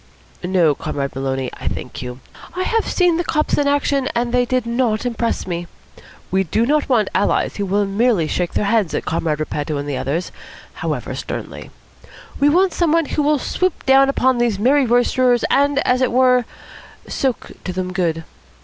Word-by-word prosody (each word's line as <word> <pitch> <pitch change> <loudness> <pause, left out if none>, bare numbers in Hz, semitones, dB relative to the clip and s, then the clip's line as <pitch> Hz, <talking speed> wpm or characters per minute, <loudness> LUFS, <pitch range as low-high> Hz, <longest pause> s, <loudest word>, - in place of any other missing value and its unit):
"No, 175 -4 +3
Comrade 140 0 -4
Maloney, 135 -1 -2
I - - -5
thank - - -5
you. 125 +1 -7 0.3
I 370 - -1
have 455 +3 0
seen 355 -3 +2
the 345 - 0
cops 305 -2 0
in 285 - +1
action, 280 -1 +1
and 240 0 0
they 250 0 +3
did 255 -1 0
not 235 -2 0
impress 235 -1 -1
me. 175 -1 -4 0.6
We 190 +1 +2
do 220 +6 0
not 295 +2 +1
want 225 -6 +2
allies - - +1
who 200 -1 -2
will 200 +2 +1
merely 200 -4 +1
shake 175 +2 -2
their - - +1
heads 205 -5 +1
at - - -3
Comrade 160 -2 -1
Repetto 150 -1 -3
and 145 +1 -4
the 140 -2 -2
others, 160 +8 -2 0.4
however - - -4
sternly. - - -6 0.7
We 285 - +4
want 365 +4 +3
some 340 -3 +1
one 330 0 +3
who 300 - -1
will 295 +1 +2
swoop 365 +6 -2
down 270 0 +5
upon 260 -2 +2
these 235 -4 +1
merry 260 +5 +3
roisterers, 245 +1 +2
and, 285 0 +3
as 250 +1 +2
it 255 - +2
were, 250 0 +4 0.6
soak 260 -4 -2
to 185 - -2
them 185 0 -4
good. 165 -3 -1
235 Hz, 185 wpm, -19 LUFS, 180-275 Hz, 0.7 s, down